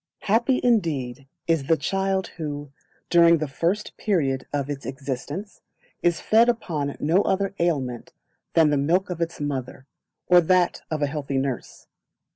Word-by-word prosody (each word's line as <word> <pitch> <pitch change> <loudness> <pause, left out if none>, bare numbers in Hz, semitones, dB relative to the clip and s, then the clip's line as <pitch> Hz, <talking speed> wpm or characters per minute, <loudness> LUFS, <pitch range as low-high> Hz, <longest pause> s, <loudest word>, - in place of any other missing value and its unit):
Happy 235 +5 +2
indeed 145 - 0 0.2
is 165 -4 +1
the 165 - +4
child 190 +4 0
who, 145 -3 -5 0.4
during 170 -1 +6
the 155 -1 -2
first 175 +9 -2
period 140 -10 0
of 140 -2 -1
its 145 -1 -5
existence, 140 - -6 0.4
is 170 -2 +2
fed 230 +2 +4
upon 155 -12 -2
no 165 +6 +3
other 195 0 0
aliment 135 -8 -1 0.4
than 160 -2 +5
the 145 - +2
milk 175 +7 +1
of 170 -1 -5
its 170 0 -2
mother, 135 -3 -4 0.4
or 180 0 +6
that 180 +1 +2
of 155 -2 -1
a - - +4
healthy 140 -2 -3
nurse. 135 -2 -4
160 Hz, 150 wpm, -24 LUFS, 140-185 Hz, 0.4 s, during